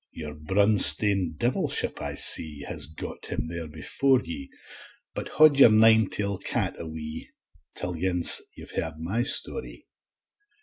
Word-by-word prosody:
Your 75 -2 -9
brunstane 95 +1 +5
devilship, 120 +7 -2
I - - -3
see, 75 -3 +1
Has 75 -5 -2
got 80 - -10
him - - -5
there 85 -1 -5
before 125 - -1
ye; 70 -5 -9 0.6
But - - -7
haud 155 -3 +3
your 135 - +7
nine 110 -1 +3
tail 100 -2 -5
cat - - -3
a 85 - -8
wee, 80 0 -10 0.5
Till 90 - -5
ance 90 +1 0
you've - - -12
heard - - -4
my 90 +9 -4
story. 145 - -5
90 Hz, 140 wpm, -24 LUFS, 80-110 Hz, 0.6 s, your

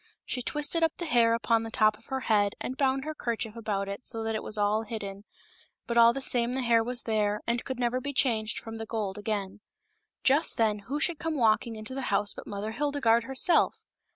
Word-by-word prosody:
She 250 - -3
twisted 295 +6 -1
up 325 -1 +1
the 345 - -4
hair 235 -6 +4
upon 230 -1 +1
the 225 - -5
top 215 -2 +3
of - - -22
her 265 0 -3
head 205 -4 +2
and 255 - -4
bound 270 0 +1
her 310 - -3
kerchief 230 -5 -3
about 205 -3 -2
it 200 +5 -6
so 225 -2 -2
that 225 0 -1
it 215 - -2
was 215 - -2
all 210 +1 +2
hidden; 205 -3 -6 0.6
but 235 - -3
all 235 0 +7
the 275 +3 -4
same 245 -2 +1
the 260 0 -1
hair 230 -1 +4
was 245 +1 -2
there, 210 -2 0
and 235 0 -1
could 260 - -4
never 245 +1 0
be 285 +2 -3
changed 225 -5 0
from 225 0 -7
the 225 0 -6
gold 210 -3 -3
again. 205 -2 -3 0.6
Just 285 +5 +4
then 215 -2 +2
who 290 +2 -1
should 330 +1 0
come 325 -2 -2
walking 225 -1 +2
into 215 +3 -7
the 265 -1 -3
house 205 0 +1
but - - -10
Mother 205 +2 -4
Hilde 285 +4 -1
garde 230 -2 +3
herself. 270 +6 +2
230 Hz, 230 wpm, -28 LUFS, 215-260 Hz, 0.6 s, all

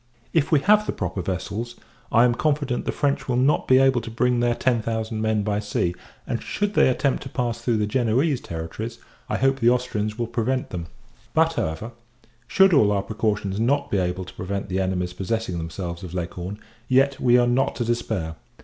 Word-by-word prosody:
If 160 -1 +2
we 150 -3 +4
have 210 +3 +4
the - - +1
proper 95 - -3
vessels, 100 +6 -4 0.4
I 115 - +5
am 125 -1 +4
confident, 140 -1 0
the - - 0
French 140 -1 -1
will 125 - +1
not 130 +4 +2
be 130 - +6
able 135 -2 +4
to - - -7
bring 125 +2 +1
their 120 0 +2
ten 120 -2 +1
thousand 110 0 -3
men 110 -1 +1
by 105 0 0
sea; 105 -4 -1 0.3
and; - - -3
should 205 0 -2
they - - +5
attempt 135 +1 0
to 135 - -7
pass 120 -3 -2
through 120 -3 +1
the 105 - +1
Genoese 125 +5 +1
territories, 85 +8 -6 0.3
I - - 0
hope 135 0 +2
the 120 -1 +5
Austrians 110 -4 -1
will 120 - -1
prevent 120 +3 -1
them: 85 -2 -5 0.5
but, 160 +1 +4
however, 95 - -3 0.6
should 190 +9 +5
all 110 -9 +5
our 100 -1 +1
precautions 105 -2 -1
not 140 +5 +1
be 100 - +2
able 90 0 -2
to - - -11
prevent 100 +2 -4
the 95 +1 -1
enemy's 90 -1 -1
possessing 95 -2 -2
themselves 85 +1 -5
of 90 -1 -7
Leghorn, 90 +3 -4 0.3
yet 135 +2 +3
we 120 -1 +5
are 120 - +4
not 125 +2 +1
to 120 - -2
despair. 110 -9 -2
115 Hz, 205 wpm, -24 LUFS, 100-130 Hz, 0.6 s, be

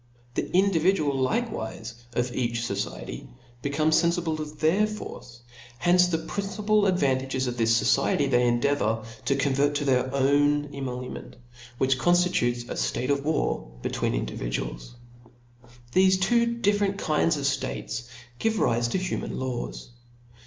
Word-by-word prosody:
The - - -2
individuals 175 -6 +2
likewife 120 - -2 0.2
of 120 +1 -1
each 120 -2 -1
fociety 100 - -4 0.3
become 155 +3 +1
fcpfible 170 -1 +2
of 150 0 -7
their 185 +7 +3
force; 125 - -9 0.4
hence 180 +5 +4
the 170 -2 0
principal 205 +5 0
advan 140 -8 +2
tages 130 0 -2
of 125 -1 -2
this 115 0 +3
fociety 135 +3 +2
they 125 -2 +3
endeavour 120 -2 +1 0.2
to 135 - +2
convert 140 +1 +1
to 145 - -1
their 130 -1 +2
own 145 +2 +2
emolument, 125 -2 -6 0.4
which 130 0 +2
conftitutes 175 -10 +2
a - - -4
ftate 125 +3 -1
of 140 -1 0
war 145 - -1
betwixt - - -1
individuals. - - -4 1.0
Thefe 185 0 +4
two 235 +5 +3
different 205 -3 +1
kinds 155 -2 +1
of 140 - -4
ftates 120 - -2 0.3
give 225 0 +1
rife 120 - +1
to - - 0
human 185 -1 -3
laws. 120 - -4
140 Hz, 135 wpm, -26 LUFS, 120-175 Hz, 1.0 s, hence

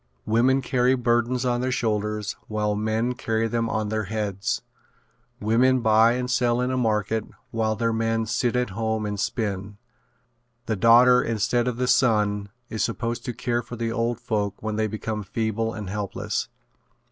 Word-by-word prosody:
Women 130 +4 +3
carry 125 +1 +2
burdens 120 +1 +1
on 120 -1 +1
their 130 0 0
shoulders 105 -3 -1
while 105 -1 0
men 110 +3 0
carry 115 -2 -1
them 115 0 -1
on 110 -1 -1
their 110 -1 -1
heads. 100 -1 -2 0.8
Women 125 +4 +3
buy 110 +1 +5
and 125 0 -2
sell 125 -1 +1
in 125 +1 0
the 130 - 0
market 110 -2 0 0.3
while 110 -1 0
their 115 0 0
men 115 0 0
sit 115 +2 0
at 125 -4 0
home 110 +1 -1
and 105 -1 -3
spin. 100 -2 -3 0.9
The 110 - -1
daughter 120 +4 +6
instead 115 +2 0
of 125 -2 -1
the 125 - 0
son 105 -5 +2 0.2
is 110 -4 -2
supposed 115 +1 -2
to 125 - -3
care 120 -1 -1
for 120 - -8
the 115 -1 -2
old 115 +1 -1
folks 100 -3 -2
when 110 0 -3
they 110 0 +1
become 110 0 -4
feeble 110 +2 -2
and 105 -3 -6
helpless. 100 0 -3
115 Hz, 170 wpm, -24 LUFS, 105-120 Hz, 0.9 s, daughter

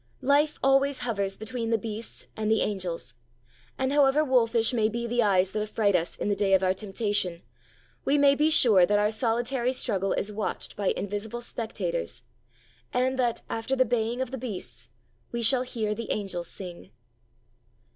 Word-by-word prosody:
Life 290 +3 +3
always 270 +1 +3
hovers 200 -5 -2
between 230 +1 -4
the 225 - +3
beasts 220 +1 -7
and 215 -1 -2
the 220 - +3
angels; 185 -5 -3 0.6
and 260 +1 0
however 290 +1 +4
wolfish 235 -3 +3
may 220 -3 +2
be 235 +2 -3
the 240 +1 +1
eyes 190 -3 +3
that 215 - -2
affright 210 -2 +1
us 170 -1 -1
in - - -3
the 205 - +1
day 195 -1 +3
of 190 - +1
our 185 0 +3
temptation, 195 -3 -1 0.6
we 285 - +2
may 280 -1 +6
be 300 +2 +2
sure 220 - +6
that 205 +3 +3
our 210 +1 +2
solitary 240 +2 0
struggle 195 -6 0
is 210 - -2
watched 210 +1 -4
by 200 -2 -2
invisible 205 +3 -4
spectators, 185 - -4 0.7
and 260 +1 0
that, 240 -2 0
after 225 +4 -2
the 255 -1 +3
baying 235 +1 -1
of 260 - -3
the 265 - -5
beasts, 225 -7 -6 0.4
we 235 0 -2
shall 250 +3 +5
hear 225 -4 -2
the 230 +1 -6
angels 190 -4 -2
sing. 175 - -9
225 Hz, 175 wpm, -27 LUFS, 200-250 Hz, 0.7 s, may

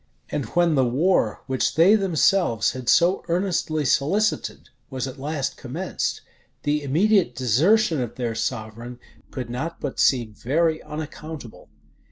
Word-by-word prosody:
And 140 - -2
when 175 -2 +3
the 135 -3 +3
war 130 - +1
which 130 -1 -1
they 170 +6 +6
themselves 185 - +2
had 130 -2 -4
so 175 +3 +4
earnestly 170 -4 0
solicited, 195 - 0 0.2
was 130 -1 -3
at 135 0 -8
last 145 -1 -3
commenced, 165 +9 -3 0.4
the 150 +1 0
immediate 170 - +2
desertion 155 - +2
of 120 - -5
their 120 -3 -2
sovereign 115 +1 -4 0.3
could 125 -3 -6
not 160 +7 -4
but 140 - -5
seem 120 -5 +2
very 160 +8 0
unaccountable. 150 - -8
145 Hz, 135 wpm, -23 LUFS, 125-170 Hz, 0.4 s, they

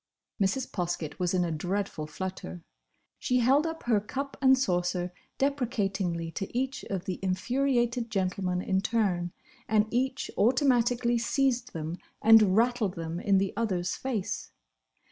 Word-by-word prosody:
Mrs. 230 +7 0
Poskett 175 -5 -3
was 180 0 +1
in 180 -1 +2
a 170 - -2
dreadful 175 0 -2
flutter. 155 - -6 0.6
She 250 - +1
held 270 +6 +4
up 325 0 -5
her 230 -4 +3
cup 275 +7 -5
and 265 -1 +6
saucer 180 -5 0 0.2
deprecatingly 200 -11 -1
to 195 +6 -4
each 265 +1 -2
of 190 -3 -4
the 185 - -3
infuriated 240 +5 0
gentlemen 185 -3 -1
in 190 0 +1
turn, 190 -6 0 0.4
and 215 0 +3
each 260 +3 -1
automatically 240 -1 +3
seized 250 0 0
them 160 +2 -4 0.2
and 215 -3 +6
rattled 230 -4 +2
them 165 0 -4
in 200 0 +3
the 195 0 0
other's 185 -6 -1
face. 235 -8 -3
205 Hz, 140 wpm, -29 LUFS, 180-245 Hz, 0.6 s, and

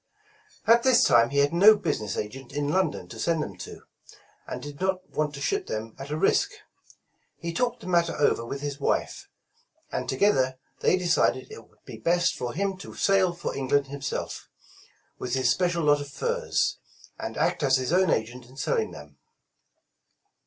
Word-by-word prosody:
At 230 +1 +6
this 255 -1 +5
time 115 0 +5
he 140 - -3
had 140 +2 +3
no 205 +5 +7
business 125 - -2
agent 120 +5 -6
in 145 0 -1
London 160 - 0
to - - -9
send 165 -2 +1
them - - -7
to, - - -9 0.6
and - - -5
did 145 +1 -9
not 190 -1 -1
want 150 -1 -1
to 140 - -8
ship - - -1
them 110 +1 -5
at 135 +1 -7
a 150 - -2
risk. - - +2 0.8
He 170 0 -5
talked 245 +7 -1
the - - -9
matter 170 -2 +2
over 145 -5 +2
with 140 +4 -5
his 145 0 -4
wife, - - -1 0.6
and - - -3
together 130 -5 +2 0.2
they 185 - +3
decided 170 -7 +1
it 115 - -11
would 105 - -32
be 115 - -9
best 170 +9 +1
for 120 -1 -4
him 195 +1 -1
to 195 - -10
sail 195 -2 +3
for 175 0 -5
Eng 135 -1 -3
land 140 0 +2
himself, 140 -1 -5 0.7
with 125 +1 -2
his 130 - +3
special 175 -2 +1
lot 145 -1 +4
of 145 - -7
furs, 480 - -1 0.4
and - - -5
act - - +1
as 135 -2 +4
his 130 +4 -2
own 185 -1 +4
agent 120 +1 -1
in 130 +2 -17
selling 125 - 0
them. 75 -1 -13
145 Hz, 185 wpm, -26 LUFS, 130-180 Hz, 0.8 s, no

